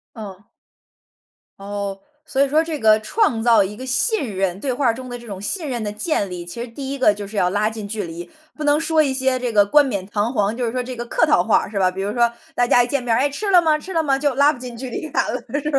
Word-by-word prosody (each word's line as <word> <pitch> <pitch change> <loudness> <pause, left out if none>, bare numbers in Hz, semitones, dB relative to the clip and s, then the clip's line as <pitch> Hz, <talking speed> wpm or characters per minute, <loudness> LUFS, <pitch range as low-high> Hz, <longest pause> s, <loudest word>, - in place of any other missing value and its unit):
嗯。 205 -2 -10 1.1
哦， 200 0 -5 0.3
所 275 -3 -2
以 280 - +4
说 310 +3 +3
这 320 -2 -4
个 215 -1 +4
创 230 - 0
造 225 -4 +5
一 205 +2 -6
个 260 - -8
信 260 - -1
任 190 0 -1
对 265 +1 -1
话 265 +2 -1
儿 230 - +3
中 255 +2 -8
的 245 0 -6
这 235 - -13
种 200 -2 -7
信 320 - -3
任 240 -4 -3
的 210 - -2
建 210 - -2
立， 175 -1 -6
其 175 +7 -8
实 245 - -6
第 270 +3 -6
一 - - -3
个 255 -6 +4
就 205 0 -7
是 210 - -9
要 180 -2 +2
拉 205 +3 +1
近 220 -2 -6
距 210 -1 -3
离， 170 0 -8 0.3
不 305 - -6
能 295 0 +3
说 320 -1 +2
一 275 -3 0
些 260 -1 0
这 245 -2 -2
个 205 -2 +5
冠 295 +7 +5
冕 200 -8 -3
堂 210 +3 -1
皇， 210 -2 0
就 250 - -2
是 230 - 0
说 255 - -2
这 250 +1 -5
个 240 0 -5
客 320 - +2
套 300 - +4
话， 220 - +2
是 205 - -9
吧？ 185 -1 +3
比 190 - -7
如 200 +2 -2
说 235 0 +2 0.2
大 245 - +2
家 245 0 +4
一 - - -3
见 265 +1 -1
面 240 -2 -1
儿， 225 - +3
“哎， 275 +3 +2
吃 395 +9 -3
了 360 -2 +7
吗？ 315 -2 +2
吃 375 +5 -8
了 330 - +1
吗？” 280 -4 +2
就 290 -1 +1
拉 285 +2 +5
不 290 - -10
近 245 -2 -8
距 260 +2 -6
离 280 +5 -5
感 - - +1
了， - - -4 0.2
是 295 - -3
240 Hz, 315 characters per minute, -21 LUFS, 205-280 Hz, 1.1 s, 了